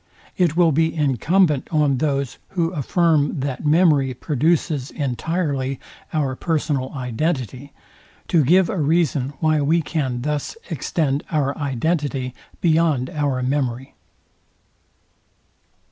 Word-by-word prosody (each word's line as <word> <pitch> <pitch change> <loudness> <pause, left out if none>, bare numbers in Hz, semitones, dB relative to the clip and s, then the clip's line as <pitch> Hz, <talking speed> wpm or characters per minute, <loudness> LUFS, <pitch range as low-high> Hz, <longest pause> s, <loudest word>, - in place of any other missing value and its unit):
It 170 -3 +1
will 170 -2 +5
be 160 +3 +1
incumbent 150 - +2
on 150 -5 +2
those, 140 -3 -1
who 170 -3 0
affirm 155 -2 +1
that 140 +2 -3
memory 150 -5 +3
produces 150 0 0
entirely 140 -1 -2 0.3
our 140 -4 -1
personal 145 -4 -1
identity, 130 - -3 0.6
to 165 -3 +3
give 175 +6 +4
a 195 - -2
reason 145 -3 +1
why 155 -2 +2
we 160 +4 +2
can 130 -7 -2
thus 150 - -3
extend 145 -4 -1
our 145 -3 0
identity 140 -2 -1 0.3
beyond 160 -6 +2
our 140 -4 -1
memory. 130 -1 -2
145 Hz, 110 wpm, -21 LUFS, 135-165 Hz, 0.6 s, will